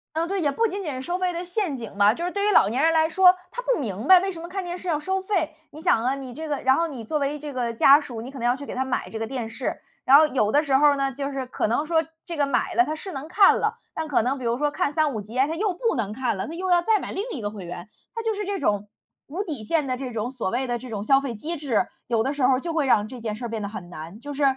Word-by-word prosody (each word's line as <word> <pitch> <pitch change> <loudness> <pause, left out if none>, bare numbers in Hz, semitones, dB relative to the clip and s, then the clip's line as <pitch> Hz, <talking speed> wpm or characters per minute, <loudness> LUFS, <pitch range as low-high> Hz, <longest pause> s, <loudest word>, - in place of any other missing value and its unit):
呃 325 +1 0
对， 390 +2 -2
也 295 -4 +2
不 455 +11 +1
仅 400 -1 -4
仅 310 -6 -3
是 255 - -5
收 350 +6 -2
费 365 -1 0
的 345 +1 -4
陷 355 -5 -2
阱 230 -5 -8
吧， 205 +1 +5
就 340 - -4
是 355 - -2
对 400 0 -1
于 - - +4
老 405 - +5
年 250 +6 0
人 325 +1 +4
来 320 -1 +3
说， 365 +2 +6 0.2
他 - - -4
不 - - +1
明 220 -3 -4
白 375 - +10
为 385 +2 -2
什 335 - -8
么 340 - -7
看 380 +1 -4
电 350 0 -4
视 365 - -7
要 315 -3 +1
收 380 +5 -1
费。 355 -6 -1 0.2
你 310 - -11
想 235 -9 +2
啊， 260 +2 +2
你 260 -3 -8
这 315 +4 -6
个 290 - 0
然 260 0 +5
后 335 0 +1
你 255 -7 -7
作 300 +8 -1
为 285 +1 -1
这 295 0 -7
个 245 -3 -2
家 275 +5 +7
属， 245 -6 -7
你 235 - -7
可 275 - -9
能 - - -4
要 245 +1 +3
去 285 +1 -9
给 - - -6
他 260 - -1
买 260 -1 -2
这 225 - -6
个 225 - -2
电 245 -3 -4
视， 225 - -4 0.2
然 270 - +8
后 310 - +6
有 255 -8 +1
的 295 +6 +3
时 275 -3 +3
候 295 +2 +6
儿 285 - +3
呢， 275 -1 0
就 275 +2 -4
是 270 -2 -4
可 250 - -1
能 265 +7 0
说 325 0 +2 0.2
这 340 - -6
个 290 -1 +2
买 275 - 0
了 360 - +5
它 310 -1 -3
是 375 +4 -6
能 280 +2 -6
看 390 +3 +6
了， 440 +2 -1 0.2
但 320 -1 -3
可 290 - +2
能 255 +4 0
比 255 - -7
如 235 +1 0
说 295 0 0
看 290 - 0
3-5 290 -7 +1
集 215 +5 -7
啊， 265 - +4
它 315 - -3
又 390 +2 0
不 460 +5 0
能 210 -4 -2
看 250 -1 -1
了， 190 - -4
它 320 - -6
又 370 +2 -3
要 350 -1 +5
再 435 +4 +3
买 - - -6
另 390 - -2
一 270 - -5
个 205 - -2
会 200 -4 -8
员。 175 +2 -8 0.3
它 460 - -3
就 450 -1 0
是 415 0 -3
这 400 0 -2
种， 210 - 0 0.4
无 355 +8 -3
底 300 - -4
线 300 +6 0
的 255 -1 -1
这 255 -1 -5
种 230 +3 -3
所 240 -7 -2
谓 255 +4 -1
的 240 -1 -1
这 250 +1 -8
种 205 -2 -4
消 270 +4 +5
费 265 -5 -4
机 315 +10 -4
制， 275 -8 0 0.2
有 230 -2 +1
的 270 - 0
时 290 -2 -3
候 255 +1 +5
儿 - - -3
就 335 +3 -4
会 320 -2 +1
让 210 -6 +3
这 245 +2 -9
件 220 -2 -3
事 245 - -7
儿 - - -2
变 225 -1 -4
得 200 - -3
很 185 -4 -8
难。 170 +3 -9
就 290 +4 -7
是 285 - -3
280 Hz, 360 characters per minute, -24 LUFS, 240-335 Hz, 0.4 s, 白